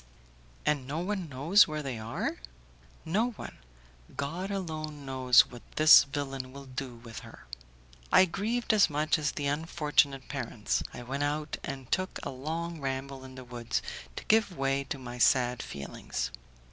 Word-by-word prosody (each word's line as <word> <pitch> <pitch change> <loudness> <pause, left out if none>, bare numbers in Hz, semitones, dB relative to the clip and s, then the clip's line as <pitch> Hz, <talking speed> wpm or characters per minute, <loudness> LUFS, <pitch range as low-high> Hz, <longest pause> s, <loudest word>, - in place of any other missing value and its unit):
"And 140 -4 +1
no 145 +3 -3
one 185 -1 -2
knows 150 +10 +5
where 155 -1 -3
they 130 -5 -4
are?" 110 +2 -3 0.7
"No 210 +9 +1
one. - - -9 0.6
God 170 +7 -3
alone 155 -7 -4
knows 130 -2 +6
what 120 -1 -9
this 155 -2 +9
villain 135 -2 -4
will 140 +1 -10
do 130 -1 -6
with 115 -1 -9
her." - - -13 0.7
I 190 - +8
grieved 220 +7 0
as 210 -2 +5
much 155 +1 +1
as 150 -2 0
the 145 - -3
unfortunate 145 -2 +1
parents; 120 -6 -2
I 125 - -8
went 135 +4 -3
out 150 +1 -1
and 135 -3 -6
took 185 0 0
a - - -3
long 160 +5 -4
ramble 135 0 -4
in 130 0 -11
the 130 - -8
woods 120 -1 -3 0.3
to - - -7
give 215 -5 +3
way 135 0 0
to 140 - -4
my 125 -1 -8
sad 125 0 +4
feelings. 60 -3 -5
140 Hz, 160 wpm, -30 LUFS, 130-160 Hz, 0.7 s, this